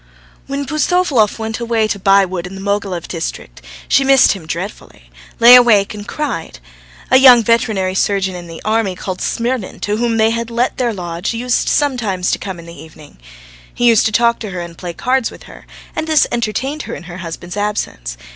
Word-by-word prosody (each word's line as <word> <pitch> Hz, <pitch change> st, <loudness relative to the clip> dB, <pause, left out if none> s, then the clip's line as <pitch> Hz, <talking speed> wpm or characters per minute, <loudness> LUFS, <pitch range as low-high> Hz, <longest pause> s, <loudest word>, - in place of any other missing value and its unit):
When 280 Hz, +1 st, -3 dB
Pustovalov 305 Hz, -, +1 dB
went 220 Hz, 0 st, -4 dB
away 230 Hz, -2 st, 0 dB
to 205 Hz, -, -3 dB
buy 195 Hz, +1 st, +4 dB
wood 180 Hz, -1 st, -5 dB
in 190 Hz, -, -10 dB
the -, -, -8 dB
Mogilev 195 Hz, -3 st, -2 dB
district, 165 Hz, -2 st, -6 dB, 0.3 s
she 275 Hz, -, +3 dB
missed 270 Hz, -1 st, +5 dB
him 180 Hz, -6 st, -6 dB
dreadfully, 165 Hz, -, -7 dB, 0.3 s
lay 235 Hz, +1 st, +9 dB
awake 230 Hz, -6 st, +6 dB
and 205 Hz, -1 st, -9 dB
cried. 270 Hz, -, -4 dB, 0.5 s
A 260 Hz, -, +7 dB
young 255 Hz, -3 st, +8 dB
veterinary 215 Hz, -4 st, +1 dB
surgeon 190 Hz, 0 st, 0 dB
in 175 Hz, -1 st, -8 dB
the 165 Hz, -1 st, -10 dB
army, 215 Hz, -3 st, 0 dB
called 185 Hz, 0 st, -6 dB
Smirnin, 235 Hz, -3 st, -2 dB
to 210 Hz, +1 st, -1 dB
whom 230 Hz, -1 st, 0 dB
they 220 Hz, 0 st, +3 dB
had 230 Hz, 0 st, -3 dB
let 235 Hz, +2 st, -1 dB
their 245 Hz, -2 st, 0 dB
lodge, 180 Hz, +1 st, -4 dB
used 245 Hz, +1 st, 0 dB
sometimes 230 Hz, -11 st, 0 dB
to -, -, -1 dB
come 190 Hz, -3 st, -6 dB
in 170 Hz, 0 st, -12 dB
in 170 Hz, -, -10 dB
the -, -, -12 dB
evening. 155 Hz, -, -15 dB, 0.5 s
He 240 Hz, -, -2 dB
used 230 Hz, -3 st, +5 dB
to -, -, -3 dB
talk 235 Hz, +2 st, +2 dB
to 215 Hz, -, -6 dB
her 180 Hz, -2 st, -5 dB
and 170 Hz, -1 st, -8 dB
play 175 Hz, 0 st, -7 dB
cards 255 Hz, +5 st, 0 dB
with -, -, -14 dB
her, -, -, -15 dB, 0.3 s
and 315 Hz, -, -3 dB
this 310 Hz, -2 st, +4 dB
entertained 240 Hz, +6 st, -2 dB
her -, -, -4 dB
in -, -, -10 dB
her 175 Hz, 0 st, -9 dB
husband's 175 Hz, 0 st, -7 dB
absence. 205 Hz, -, -3 dB
210 Hz, 205 wpm, -16 LUFS, 185-240 Hz, 0.5 s, lay